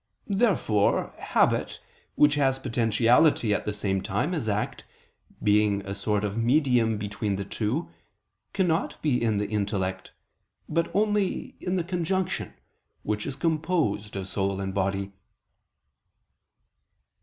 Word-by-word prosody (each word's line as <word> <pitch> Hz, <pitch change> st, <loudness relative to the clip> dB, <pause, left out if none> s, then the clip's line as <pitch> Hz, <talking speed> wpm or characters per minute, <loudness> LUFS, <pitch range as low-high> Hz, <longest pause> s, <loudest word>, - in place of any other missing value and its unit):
Therefore 180 Hz, -, +2 dB
habit, -, -, +1 dB, 0.4 s
which 145 Hz, 0 st, +5 dB
has 135 Hz, -2 st, +2 dB
potentiality 120 Hz, 0 st, +3 dB
at -, -, -2 dB
the 105 Hz, -, -1 dB
same 100 Hz, -2 st, -1 dB
time 100 Hz, -, -1 dB
as 145 Hz, -10 st, -2 dB
act, 105 Hz, +1 st, -2 dB, 0.6 s
being 105 Hz, -1 st, +3 dB
a 100 Hz, -, -4 dB
sort 105 Hz, +1 st, -1 dB
of 100 Hz, -1 st, -2 dB
medium 120 Hz, -3 st, +3 dB
between 105 Hz, 0 st, -2 dB
the 100 Hz, 0 st, -4 dB
two, 115 Hz, -, -2 dB, 0.6 s
cannot 175 Hz, -4 st, 0 dB
be 140 Hz, -6 st, +2 dB
in 110 Hz, -3 st, +1 dB
the 105 Hz, -, 0 dB
intellect; 100 Hz, -3 st, -2 dB, 0.6 s
but 165 Hz, +2 st, 0 dB
only 210 Hz, -1 st, 0 dB
in 180 Hz, 0 st, -2 dB
the 180 Hz, -, 0 dB
conjunction, 185 Hz, +1 st, -2 dB, 0.5 s
which 105 Hz, 0 st, -2 dB
is 135 Hz, -, -4 dB
composed 155 Hz, -, 0 dB
of 95 Hz, -1 st, -4 dB
soul 100 Hz, 0 st, -1 dB
and 95 Hz, -1 st, -3 dB
body. 95 Hz, 0 st, -1 dB
110 Hz, 125 wpm, -26 LUFS, 100-155 Hz, 0.6 s, which